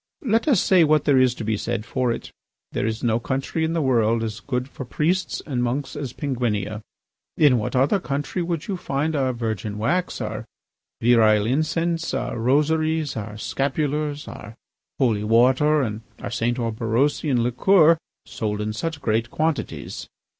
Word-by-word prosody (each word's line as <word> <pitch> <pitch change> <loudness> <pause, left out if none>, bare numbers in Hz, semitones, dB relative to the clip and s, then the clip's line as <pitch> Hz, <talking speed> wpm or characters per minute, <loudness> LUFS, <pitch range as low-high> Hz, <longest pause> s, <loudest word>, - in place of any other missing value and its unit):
Let 230 +1 +1
us 260 - +4
say 185 -1 +5
what 155 -1 +3
there 140 -3 +4
is 130 -1 +3
to - - -6
be 110 0 0
said 115 0 -3
for 125 -2 0
it. - - -5 0.4
There - - -1
is 110 +2 -3
no 115 -1 +2
country 135 +6 -2
in 160 +1 0
the 165 -2 0
world 115 -3 +2
as 110 0 -4
good 125 -1 -3
for 135 - -8
priests 170 +9 -1
and 130 -5 -2
monks 130 +4 -2
as 135 -5 -4
Penguinia. 115 -7 -2 0.6
In 140 -6 +5
what 105 - -3
other 140 +10 +3
country 145 +3 -3
would 170 -2 -3
you 195 -3 -2
find 155 -2 -1
our 135 -2 +1
virgin 110 -3 -3
wax, 175 +12 0
our - - -4 0.6
virile 110 -3 +5
incense, 165 +6 0
our - - -2
rosaries, 155 +4 +1
our 105 -1 -5
scapulars, 145 +4 -2
our 105 +2 -9 0.4
holy 115 -6 +1
water, 130 +7 +4
and 110 -2 -3 0.2
our - - -6
St. 120 +1 0
Orberosian 120 +3 0
liqueur 160 +6 +4 0.3
sold 105 -1 -3
in 105 0 -2
such 160 +6 -4
great 115 0 0
quantities? 155 +1 -3
130 Hz, 165 wpm, -23 LUFS, 115-155 Hz, 0.6 s, say